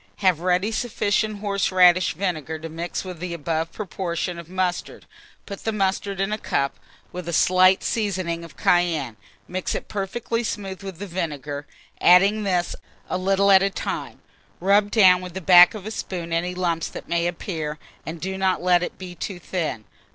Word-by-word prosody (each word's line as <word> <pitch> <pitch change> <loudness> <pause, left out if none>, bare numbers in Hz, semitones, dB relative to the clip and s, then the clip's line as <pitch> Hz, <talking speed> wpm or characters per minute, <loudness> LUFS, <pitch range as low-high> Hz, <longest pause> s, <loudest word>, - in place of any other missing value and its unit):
Have 185 -5 +2
ready 185 +4 +1
sufficient 215 -2 -1
horseradish 185 -4 +3
vinegar 160 -4 -2
to 165 +1 -7
mix 165 +2 -4
with 180 -3 -7
the 175 0 -4
above 165 0 -2
proportion 180 -3 -4
of 170 -1 -11
mustard; 185 -1 -2 0.4
put 200 - -8
the 225 - 0
mustard 195 -1 -1
in 195 +2 0
a 215 - -3
cup, 140 -7 -1 0.3
with 180 -1 -6
a - - -3
slight 185 +3 +4
seasoning 185 -6 -1
of 165 -1 -13
cayenne; 165 -9 +1 0.3
mix 185 0 -3
it - - -5
perfectly 230 +3 -3
smooth 195 -4 -4
with 195 -3 -7
the 205 - -6
vinegar, 150 -6 -4 0.3
adding 195 +5 +5
this 180 -4 0 0.4
a - - +1
little 195 +1 +3
at 190 -1 +7
a 195 - +2
time; 195 - -5 0.4
rub 200 +3 +3
down 185 -5 +6
with 180 -1 -8
the - - -2
back 180 +2 +7
of 205 -3 -8
a 215 - -4
spoon 175 -6 -5
any 175 +2 -1
lumps 170 -3 -1
that - - -9
may 170 0 +1
appear, 160 -3 -4 0.3
and 160 +1 -6
do 190 +3 -4
not 190 -1 +2
let 180 -1 +3
it 180 - -4
be 185 -2 -8
too 180 +2 -5
thin. 165 - -3
180 Hz, 180 wpm, -23 LUFS, 170-195 Hz, 0.4 s, at